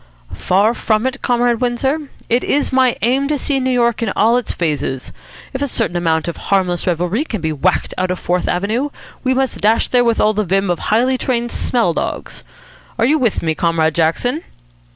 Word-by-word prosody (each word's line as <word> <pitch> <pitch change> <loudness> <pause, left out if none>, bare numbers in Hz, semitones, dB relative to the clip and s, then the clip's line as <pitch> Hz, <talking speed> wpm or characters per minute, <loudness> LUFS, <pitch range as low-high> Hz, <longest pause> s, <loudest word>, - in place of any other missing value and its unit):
"Far 200 +5 +2
from 220 -1 0
it, 260 +1 -2
Comrade 240 -1 +1
Windsor. 265 +4 -1 0.2
It 240 +2 +1
is 285 -2 0
my 260 -2 +3
aim 265 +4 +2
to 295 0 0
see 275 0 0
New 260 0 0
York 235 -3 +1
in 225 -4 0
all 225 +3 +4
its 250 -2 -1
phases. 145 -6 -3 0.4
If 265 - -4
a 285 - +1
certain 230 -8 -2
amount 165 -2 0
of 170 - -4
harmless 185 -3 0
revelry 180 - 0
can 225 -9 -4
be 160 -1 -2
whacked 175 +5 0
out 185 0 0
of 180 - -1
Fourth 180 0 -1
Avenue, 215 +10 0 0.3
we 260 0 +1
must 265 -1 -1
dash 220 +2 +2
there 245 -1 +4
with 230 -1 +2
the 215 - +3
vim 195 0 +1
of 175 - -2
highly 250 +4 +1
trained 240 -2 -1
smell 230 -9 0
dogs. - - -4 0.5
Are - - +2
you 305 +5 +3
with 235 -9 0
me, 160 -1 +1
Comrade 160 -1 +1
Jackson?" 170 - 0
230 Hz, 195 wpm, -17 LUFS, 180-255 Hz, 0.5 s, all